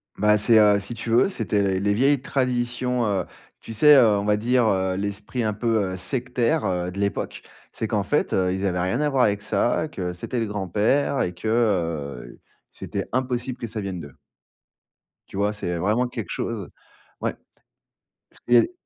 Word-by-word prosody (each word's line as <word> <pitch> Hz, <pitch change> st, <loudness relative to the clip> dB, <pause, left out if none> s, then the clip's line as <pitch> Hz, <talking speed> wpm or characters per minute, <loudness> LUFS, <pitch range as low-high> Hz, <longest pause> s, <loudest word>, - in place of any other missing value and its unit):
Bah 105 Hz, +1 st, +3 dB
c'est, 115 Hz, +1 st, +5 dB
heu, 105 Hz, -1 st, +5 dB
si 100 Hz, +4 st, -5 dB
tu 115 Hz, +1 st, -5 dB
veux, 120 Hz, +11 st, +4 dB
c'était 110 Hz, -, -1 dB
les 95 Hz, -1 st, +1 dB
les 100 Hz, +1 st, +1 dB
vieilles 135 Hz, +4 st, +3 dB
traditions, 125 Hz, -2 st, 0 dB
heu, 100 Hz, -2 st, 0 dB, 0.3 s
tu 115 Hz, -, -9 dB
sais, 150 Hz, +6 st, +7 dB
heu, 110 Hz, -5 st, +5 dB
on 100 Hz, -, -2 dB
va 105 Hz, 0 st, +3 dB
dire, 120 Hz, +2 st, +2 dB
heu, 95 Hz, -2 st, +1 dB
l'esprit 100 Hz, +4 st, -3 dB
un 110 Hz, -1 st, 0 dB
peu, 110 Hz, -3 st, 0 dB
heu, -, -, -5 dB
sectaire, 125 Hz, -, -1 dB
heu, 90 Hz, -1 st, -1 dB
de 100 Hz, -, -7 dB
l'époque. 100 Hz, 0 st, -2 dB, 0.3 s
C'est -, -, -4 dB
qu'en -, -, 0 dB
fait, -, -, 0 dB
heu, 90 Hz, -1 st, +2 dB
ils 95 Hz, +1 st, -2 dB
avaient 90 Hz, -2 st, 0 dB
rien 95 Hz, +9 st, 0 dB
à 150 Hz, -, +2 dB
voir 135 Hz, -3 st, +3 dB
avec 105 Hz, 0 st, 0 dB
ça, 120 Hz, +9 st, +1 dB
que 90 Hz, -2 st, -4 dB
c'était 115 Hz, +7 st, -4 dB
le 115 Hz, -, -1 dB
grand-père 105 Hz, -, 0 dB
et 90 Hz, -, -1 dB
que, 100 Hz, +5 st, -6 dB
heu, 85 Hz, -, -1 dB, 0.3 s
c'était -, -, -5 dB
impossible 125 Hz, 0 st, -2 dB
que 115 Hz, -, -4 dB
ça 110 Hz, 0 st, -5 dB
vienne 95 Hz, -3 st, -4 dB
d'eux. 70 Hz, -4 st, -11 dB, 1.1 s
Tu 95 Hz, -, -9 dB
vois? 105 Hz, +1 st, +1 dB
C'est 90 Hz, -4 st, -3 dB
vraiment 110 Hz, +8 st, +1 dB
quelque 115 Hz, -7 st, -6 dB
chose. 110 Hz, -5 st, -4 dB, 0.5 s
Ouais. -, -, -1 dB, 0.9 s
Parce -, -, -13 dB
qu'il 120 Hz, -, -1 dB
y -, -, +10 dB
a -, -, +8 dB
les -, -, -3 dB
105 Hz, 200 wpm, -24 LUFS, 95-120 Hz, 1.1 s, y